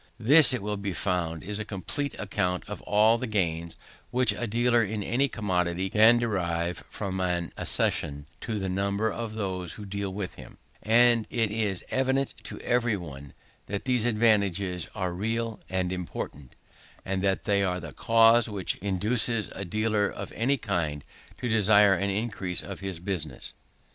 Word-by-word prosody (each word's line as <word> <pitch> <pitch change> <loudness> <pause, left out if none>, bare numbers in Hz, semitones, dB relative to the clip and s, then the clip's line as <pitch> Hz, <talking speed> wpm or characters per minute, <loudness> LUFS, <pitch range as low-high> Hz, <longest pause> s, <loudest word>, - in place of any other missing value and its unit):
This, 140 +5 +6
it 125 -6 -2
will 105 0 -2
be 100 -1 -3
found, 85 -4 -2
is 105 +2 -4
a - - -2
complete 110 - -3
account 90 -3 -1
of 105 - -6
all 110 +3 +4
the 130 - -3
gains 85 -5 -1 0.3
which 125 -3 +2
a 120 +3 -3
dealer 120 +2 +3
in 105 0 -3
any 130 +7 +1
commodity 95 -5 -1
can 110 +2 +6
derive 90 -7 -1
from 95 -2 -4
an 90 -2 -1
accession 70 0 0
to 110 -2 -3
the 95 -2 -2
number 100 +3 0
of 110 0 -5
those 95 -4 -3
who 105 - -9
deal 100 0 -4
with 95 -1 -4
him: - - -14 0.2
and 115 0 +4
it 115 -4 0
is 105 -4 -1
evident 135 +1 +1
to - - -7
every 120 -3 +1
one, 70 -6 -9 0.3
that 100 0 -4
these 125 -3 +1
advantages 100 -6 +1
are 95 -4 -2
real 115 +4 -2
and 95 -1 -1
important, 85 -6 -6 0.5
and 95 0 -1
that 95 -1 +1
they 100 -2 +2
are 90 -2 0
the 80 -5 -8
cause 115 - +5
which 100 -4 -2
induces 105 +3 0
a 100 - -5
dealer 105 +2 0
of - - -7
any 135 +5 +1
kind 85 - -2 0.4
to 125 - -1
desire 105 -2 +5
an 100 +2 0
increase 100 -3 -1
of 95 -3 -7
his 95 -3 -4
business. 85 -7 -4
100 Hz, 170 wpm, -27 LUFS, 90-115 Hz, 0.5 s, This